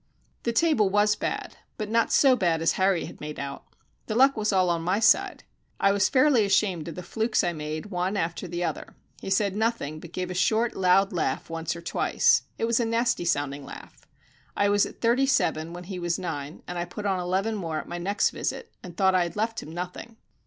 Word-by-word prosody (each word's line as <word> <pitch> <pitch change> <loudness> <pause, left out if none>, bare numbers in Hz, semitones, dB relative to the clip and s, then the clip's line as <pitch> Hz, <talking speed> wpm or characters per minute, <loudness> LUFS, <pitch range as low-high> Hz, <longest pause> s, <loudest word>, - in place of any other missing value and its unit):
The 235 - -1
table 235 -6 +3
was 205 +1 +3
bad, - - -4 0.2
but 215 - -3
not 230 +1 +1
so 270 -3 +5
bad 170 -7 +1
as 165 - +4
Harry 190 -2 +1
had - - -11
made 150 0 -6
out. 140 0 -6 0.4
The 215 - -2
luck 270 +3 +5
was 215 -1 0
all 180 -3 +2
my 180 +5 0
side. 220 - +3 0.4
I 195 - +4
was 200 -1 +2
fairly 260 -3 +4
ashamed 195 -5 +1
of 165 - -6
the 180 - -7
flukes 220 +5 0
I 175 -1 0
made, 155 +5 -5
one 185 +2 -1
after 170 +1 -2
the 175 +1 -3
other. - - -4 0.3
He - - -5
said 195 0 +1
nothing, 215 -9 -1
but 170 +1 -11
gave 180 0 -4
a - - -3
short, 220 +6 +1
loud 190 +2 +3
laugh 165 -1 -2
once 165 0 -3
or 170 - -9
twice - - +2 0.2
it - - 0
was 230 +1 +2
a 235 - +1
nasty 230 -3 0
sounding 145 -3 -1
laugh. - - -12 0.5
I 205 - +3
was 205 0 +3
at - - -14
thirty 240 +4 +3
seven 165 - +1
when 175 +1 -8
he 185 0 -6
was 175 -1 -1
nine, 150 -4 -6
and 175 0 -4
I 175 - -2
put 205 +4 -8
on 190 -2 +1
eleven 190 +5 -1
more 165 -7 -3
at - - -5
my 175 - -5
next 200 +4 +1
visit 460 - -4
and 175 -2 -11
thought 190 -1 +4
I 185 - +3
had 170 -1 -2
left 220 +1 -1
him 155 - -10
nothing. 180 +6 -7
190 Hz, 225 wpm, -26 LUFS, 170-220 Hz, 0.5 s, so